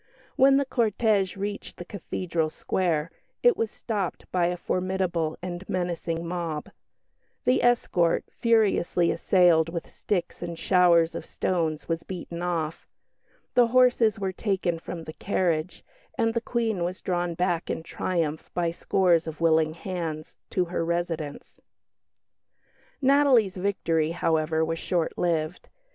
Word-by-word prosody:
When 270 Hz, +1 st, +6 dB
the 280 Hz, -, +2 dB
cortège 215 Hz, -6 st, +1 dB
reached 205 Hz, +1 st, -5 dB
the 175 Hz, -, -7 dB
Cathedral 170 Hz, -4 st, -2 dB
Square, 165 Hz, -1 st, -1 dB, 0.3 s
it 485 Hz, -1 st, +6 dB
was 225 Hz, -, -1 dB
stopped 205 Hz, -6 st, -4 dB
by 175 Hz, -2 st, +2 dB
a 180 Hz, 0 st, -2 dB
formidable 180 Hz, -3 st, -1 dB
and 180 Hz, 0 st, -5 dB
menacing 170 Hz, -2 st, -2 dB
mob; 170 Hz, -3 st, -3 dB, 0.8 s
the 250 Hz, -, +3 dB
escort, 185 Hz, -8 st, +2 dB
furiously 205 Hz, -7 st, +2 dB
assailed 175 Hz, -4 st, +4 dB
with 170 Hz, 0 st, -5 dB
sticks 180 Hz, -4 st, -3 dB
and 170 Hz, -1 st, -5 dB
showers 175 Hz, -3 st, +4 dB
of -, -, -5 dB
stones, 160 Hz, -4 st, -2 dB
was 165 Hz, -1 st, -1 dB
beaten 175 Hz, -2 st, -7 dB
off; 165 Hz, -3 st, -2 dB, 0.7 s
the 245 Hz, -1 st, +5 dB
horses 245 Hz, -2 st, +4 dB
were 195 Hz, -1 st, -2 dB
taken 185 Hz, -4 st, -1 dB
from 170 Hz, 0 st, -7 dB
the 155 Hz, -, -8 dB
carriage, 175 Hz, -3 st, -1 dB, 0.3 s
and 225 Hz, 0 st, +2 dB
the 235 Hz, -, 0 dB
Queen 225 Hz, -6 st, -1 dB
was 180 Hz, +2 st, -3 dB
drawn 175 Hz, -2 st, -1 dB
back 175 Hz, -1 st, 0 dB
in -, -, -3 dB
triumph 165 Hz, -3 st, -2 dB
by 170 Hz, -1 st, +1 dB
scores 175 Hz, -1 st, +2 dB
of 160 Hz, -, -6 dB
willing 160 Hz, -1 st, +3 dB
hands, 165 Hz, -4 st, -5 dB, 0.2 s
to 180 Hz, -, +1 dB
her 170 Hz, -1 st, -2 dB
residence. 165 Hz, -3 st, -3 dB, 1.4 s
Natalie's 265 Hz, -7 st, +4 dB
victory, 170 Hz, -5 st, 0 dB
however, 160 Hz, -1 st, +1 dB
was 165 Hz, 0 st, -3 dB
short 175 Hz, -3 st, -1 dB
lived. 165 Hz, -1 st, -1 dB
175 Hz, 135 wpm, -26 LUFS, 165-195 Hz, 1.4 s, When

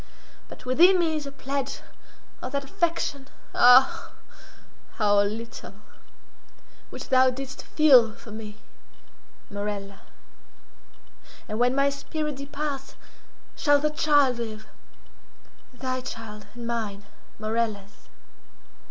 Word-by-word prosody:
But -, -, -12 dB
within 345 Hz, +9 st, +6 dB
me 330 Hz, -3 st, +1 dB
is 300 Hz, -2 st, -4 dB
a -, -, -6 dB
pledge 275 Hz, 0 st, -4 dB, 0.6 s
of 260 Hz, -, -6 dB
that 280 Hz, 0 st, -1 dB
affection—ah, 270 Hz, -4 st, +2 dB, 0.8 s
how 205 Hz, -2 st, +3 dB
little!—which 215 Hz, -1 st, -10 dB
thou 260 Hz, 0 st, +5 dB
didst 265 Hz, +1 st, -6 dB
feel 255 Hz, -8 st, +5 dB
for 230 Hz, -, -13 dB
me, 215 Hz, -1 st, -8 dB, 0.9 s
Morella. 200 Hz, -1 st, -5 dB, 1.5 s
And 215 Hz, +1 st, -4 dB
when 245 Hz, +1 st, +3 dB
my 275 Hz, 0 st, +3 dB
spirit 300 Hz, +1 st, -4 dB
departs 280 Hz, 0 st, -5 dB, 0.6 s
shall 290 Hz, -2 st, +4 dB
the 300 Hz, +1 st, 0 dB
child 290 Hz, -5 st, +3 dB
live—thy 250 Hz, +3 st, -9 dB
child 225 Hz, -5 st, -8 dB
and 240 Hz, -1 st, -7 dB
mine, 220 Hz, -4 st, -3 dB, 0.3 s
Morella's. 215 Hz, -2 st, -3 dB
255 Hz, 95 wpm, -26 LUFS, 215-280 Hz, 1.5 s, within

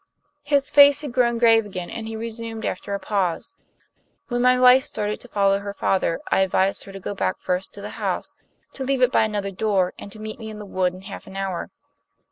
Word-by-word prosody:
His 280 Hz, -2 st, +1 dB
face 285 Hz, 0 st, +7 dB
had 290 Hz, -4 st, -5 dB
grown 240 Hz, -1 st, +2 dB
grave 225 Hz, -1 st, +5 dB
again, 185 Hz, -4 st, -6 dB
and 220 Hz, -1 st, -5 dB
he 225 Hz, -, -5 dB
resumed 225 Hz, 0 st, -5 dB
after 200 Hz, +2 st, -3 dB
a -, -, -4 dB
pause: 190 Hz, -6 st, -1 dB, 0.8 s
"When 245 Hz, -1 st, 0 dB
my 250 Hz, 0 st, +4 dB
wife 255 Hz, +1 st, +7 dB
started 210 Hz, -1 st, -3 dB
to -, -, -9 dB
follow 200 Hz, -3 st, +2 dB
her 200 Hz, 0 st, -6 dB
father 185 Hz, -4 st, 0 dB
I -, -, +4 dB
advised 190 Hz, +1 st, +1 dB
her 195 Hz, -, -10 dB
to 195 Hz, -, -8 dB
go 195 Hz, -, -4 dB
back 190 Hz, -1 st, -1 dB
first 180 Hz, +1 st, -2 dB
to -, -, -9 dB
the -, -, -6 dB
house, -, -, -2 dB, 0.4 s
to 270 Hz, -, -5 dB
leave 265 Hz, -1 st, +1 dB
it 250 Hz, -, +4 dB
by 220 Hz, -, +4 dB
another 205 Hz, -2 st, -3 dB
door 195 Hz, -2 st, 0 dB
and 200 Hz, -, -9 dB
to 215 Hz, -, -11 dB
meet 215 Hz, +1 st, -7 dB
me 220 Hz, -1 st, -7 dB
in 215 Hz, -, -8 dB
the 210 Hz, -, -8 dB
wood 185 Hz, -2 st, -1 dB
in 185 Hz, -, -11 dB
half 195 Hz, -, -9 dB
an 195 Hz, -, -9 dB
hour. 195 Hz, -3 st, -3 dB
210 Hz, 230 wpm, -23 LUFS, 195-235 Hz, 0.8 s, face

